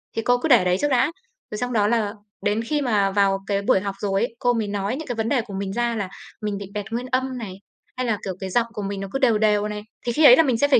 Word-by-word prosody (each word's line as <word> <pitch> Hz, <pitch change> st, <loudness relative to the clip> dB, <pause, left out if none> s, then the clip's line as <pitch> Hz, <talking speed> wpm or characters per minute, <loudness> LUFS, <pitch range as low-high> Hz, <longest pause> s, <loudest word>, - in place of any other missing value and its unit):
Thì 225 Hz, -, 0 dB
cô 245 Hz, +2 st, +3 dB
cứ 250 Hz, -, -2 dB
để 230 Hz, -8 st, +6 dB
đấy 180 Hz, 0 st, +2 dB
trước 290 Hz, -, +2 dB
đã, 265 Hz, +4 st, +3 dB, 0.4 s
rồi 210 Hz, -, -4 dB
xong 245 Hz, +2 st, -2 dB
đó 205 Hz, -2 st, +3 dB
là 220 Hz, -2 st, +1 dB, 0.3 s
đến 210 Hz, +2 st, +1 dB
khi 295 Hz, +5 st, -1 dB
mà 210 Hz, -6 st, +2 dB
vào 195 Hz, -1 st, +2 dB
cái 200 Hz, -1 st, 0 dB
buổi 200 Hz, -, +3 dB
học 200 Hz, 0 st, -4 dB
rồi 195 Hz, 0 st, 0 dB
ấy, 235 Hz, 0 st, -2 dB
cô 245 Hz, -2 st, +2 dB
mới 220 Hz, -3 st, -1 dB
nói 200 Hz, +3 st, -2 dB
những 310 Hz, 0 st, -7 dB
cái 245 Hz, -, -3 dB
vấn 225 Hz, 0 st, -1 dB
đề 265 Hz, -4 st, +2 dB
của 215 Hz, -3 st, -10 dB
mình 195 Hz, -1 st, -3 dB
ra 240 Hz, 0 st, 0 dB
là 200 Hz, -4 st, -3 dB, 0.3 s
mình 210 Hz, -2 st, -2 dB
bị 200 Hz, -, -6 dB
bẹt 205 Hz, -1 st, -3 dB
nguyên 240 Hz, +2 st, -2 dB
âm 260 Hz, 0 st, 0 dB
này, 210 Hz, -6 st, -6 dB, 0.4 s
hay 255 Hz, -, -1 dB
là, 215 Hz, -2 st, +1 dB
kiểu, 190 Hz, -, -2 dB
cái 190 Hz, -1 st, -4 dB
giọng 235 Hz, +4 st, +1 dB
của 210 Hz, -, -5 dB
mình 200 Hz, 0 st, -4 dB
nó 195 Hz, -, -4 dB
cứ 270 Hz, -, -2 dB
đều 235 Hz, -6 st, +4 dB
đều 210 Hz, -1 st, +2 dB
này. 210 Hz, 0 st, -5 dB, 0.2 s
Thì 240 Hz, -, 0 dB
khi 305 Hz, +6 st, +3 dB
ấy 250 Hz, -3 st, +11 dB
là 325 Hz, -, +5 dB
mình 255 Hz, -5 st, +1 dB
sẽ 285 Hz, -, +3 dB
phải 275 Hz, -, +5 dB
220 Hz, 310 wpm, -23 LUFS, 200-245 Hz, 0.4 s, ấy